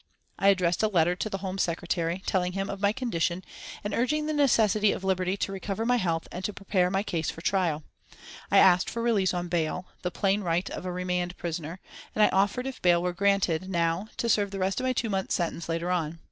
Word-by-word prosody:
I 195 Hz, -, +3 dB
addressed 180 Hz, -3 st, +3 dB
a 215 Hz, -, +3 dB
letter 175 Hz, -3 st, +2 dB
to 215 Hz, -, -3 dB
the 195 Hz, -, -3 dB
Home 190 Hz, +1 st, -3 dB
Secretary, 170 Hz, +1 st, -1 dB
telling 180 Hz, -1 st, 0 dB
him 195 Hz, +1 st, -2 dB
of 195 Hz, 0 st, -7 dB
my 200 Hz, 0 st, +4 dB
condition, 185 Hz, -7 st, -1 dB, 0.4 s
and 205 Hz, 0 st, -3 dB
urging 300 Hz, +6 st, +1 dB
the 310 Hz, -, -1 dB
necessity 215 Hz, -8 st, +3 dB
of -, -, -4 dB
liberty 185 Hz, 0 st, 0 dB
to 195 Hz, -, -2 dB
recover 195 Hz, +3 st, -3 dB
my 245 Hz, +1 st, +3 dB
health 165 Hz, -6 st, -1 dB
and 180 Hz, -, -6 dB
to 210 Hz, -, -1 dB
prepare 190 Hz, -2 st, 0 dB
my 195 Hz, +1 st, 0 dB
case 165 Hz, -6 st, -2 dB
for 165 Hz, -, -7 dB
trial. 170 Hz, -5 st, 0 dB, 0.7 s
I -, -, +4 dB
asked 180 Hz, -1 st, +6 dB
for 230 Hz, -, -3 dB
release 210 Hz, -6 st, +2 dB
on 175 Hz, -1 st, -2 dB
bail, 175 Hz, +1 st, -2 dB
the 180 Hz, -, -1 dB
plain 195 Hz, +3 st, +1 dB
right 175 Hz, 0 st, 0 dB
of 185 Hz, -, -5 dB
a -, -, -2 dB
remand 180 Hz, 0 st, -2 dB
prisoner, 165 Hz, +1 st, -5 dB, 0.4 s
and 215 Hz, -, +4 dB
I -, -, +6 dB
offered 205 Hz, +6 st, +2 dB
if 265 Hz, -1 st, -6 dB
bail 175 Hz, -1 st, +4 dB
were 180 Hz, 0 st, -1 dB
granted 190 Hz, -2 st, +1 dB
now 170 Hz, +2 st, 0 dB
to 235 Hz, -, -1 dB
serve 205 Hz, -3 st, +2 dB
the 195 Hz, -, -6 dB
rest 190 Hz, 0 st, 0 dB
of 255 Hz, -, -2 dB
my 255 Hz, -, +2 dB
two 235 Hz, -3 st, -1 dB
months' 190 Hz, -1 st, 0 dB
sentence 170 Hz, -1 st, -3 dB
later 165 Hz, +2 st, -1 dB
on. 165 Hz, -2 st, -1 dB
185 Hz, 230 wpm, -27 LUFS, 175-205 Hz, 0.7 s, asked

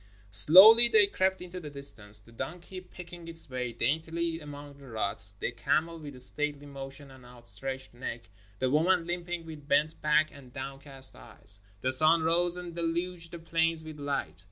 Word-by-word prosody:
Slowly 190 Hz, -, +8 dB
they 220 Hz, -3 st, +4 dB
crept 190 Hz, -2 st, -2 dB
into 180 Hz, 0 st, -9 dB
the 155 Hz, -4 st, -10 dB
distance, 115 Hz, -7 st, +3 dB
the 110 Hz, +3 st, -16 dB
donkey 175 Hz, +9 st, -9 dB
picking 175 Hz, -2 st, -13 dB
its 165 Hz, 0 st, -2 dB
way 125 Hz, -2 st, -5 dB
daintily 165 Hz, +6 st, -3 dB
among 145 Hz, -2 st, -12 dB
the 140 Hz, -, -15 dB
ruts, 100 Hz, -3 st, +1 dB
the 100 Hz, -, -5 dB
camel 155 Hz, +6 st, -2 dB
with 145 Hz, -4 st, -11 dB
stately 145 Hz, +2 st, +1 dB
motion 140 Hz, 0 st, -11 dB
and 130 Hz, -1 st, -17 dB
outstretched 125 Hz, +2 st, -9 dB
neck, 120 Hz, -1 st, -8 dB, 0.3 s
the 130 Hz, +3 st, -2 dB
woman 170 Hz, +4 st, +1 dB
limping 175 Hz, -1 st, -6 dB
with 155 Hz, -3 st, -12 dB
bent 150 Hz, +2 st, -1 dB
back 155 Hz, +1 st, +1 dB
and 135 Hz, -4 st, -16 dB
downcast 135 Hz, 0 st, -3 dB
eyes. 100 Hz, +11 st, -5 dB, 0.2 s
The 130 Hz, -, -1 dB
sun 155 Hz, +5 st, +6 dB
rose 175 Hz, +2 st, 0 dB
and 175 Hz, -2 st, -9 dB
deluged 170 Hz, 0 st, -4 dB
the 170 Hz, -, -9 dB
plains 165 Hz, -1 st, -2 dB
with 155 Hz, -1 st, -11 dB
light. 140 Hz, -8 st, -5 dB
150 Hz, 170 wpm, -27 LUFS, 130-170 Hz, 0.3 s, Slowly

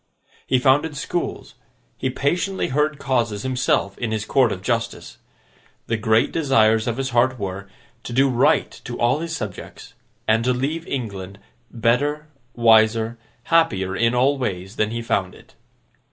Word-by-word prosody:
He 130 Hz, -, +3 dB
founded 145 Hz, +4 st, +2 dB
schools; 175 Hz, +4 st, -4 dB, 0.4 s
he 130 Hz, -, -2 dB
patiently 175 Hz, +9 st, -1 dB
heard 150 Hz, +2 st, 0 dB
causes 115 Hz, -7 st, -1 dB
himself 125 Hz, -6 st, 0 dB
in 115 Hz, -, -2 dB
his 110 Hz, -1 st, -2 dB
Court 130 Hz, -2 st, +3 dB
of 95 Hz, -1 st, -5 dB
Justice; 115 Hz, +1 st, -3 dB, 0.7 s
the 115 Hz, -, -1 dB
great 110 Hz, +1 st, +2 dB
desires 115 Hz, -7 st, +3 dB
of 120 Hz, 0 st, -1 dB
his 135 Hz, 0 st, -2 dB
heart 125 Hz, +2 st, +2 dB
were, 100 Hz, -1 st, -5 dB, 0.4 s
to -, -, -6 dB
do 135 Hz, +3 st, +3 dB
right 125 Hz, -2 st, +2 dB
to -, -, -6 dB
all 120 Hz, +5 st, +2 dB
his 165 Hz, 0 st, -4 dB
subjects, 105 Hz, -7 st, -8 dB, 0.3 s
and 110 Hz, +1 st, +3 dB
to 125 Hz, +1 st, +2 dB
leave 150 Hz, +6 st, -3 dB
England 100 Hz, -7 st, -5 dB, 0.3 s
better, 140 Hz, +6 st, 0 dB, 0.3 s
wiser, 115 Hz, 0 st, +3 dB, 0.2 s
happier 105 Hz, -, +2 dB
in 115 Hz, +4 st, +2 dB
all 135 Hz, +3 st, +2 dB
ways, 95 Hz, -4 st, -4 dB
than 105 Hz, -, +1 dB
he 115 Hz, +1 st, -4 dB
found 95 Hz, -5 st, -1 dB
it. -, -, -19 dB
120 Hz, 155 wpm, -22 LUFS, 110-135 Hz, 0.7 s, He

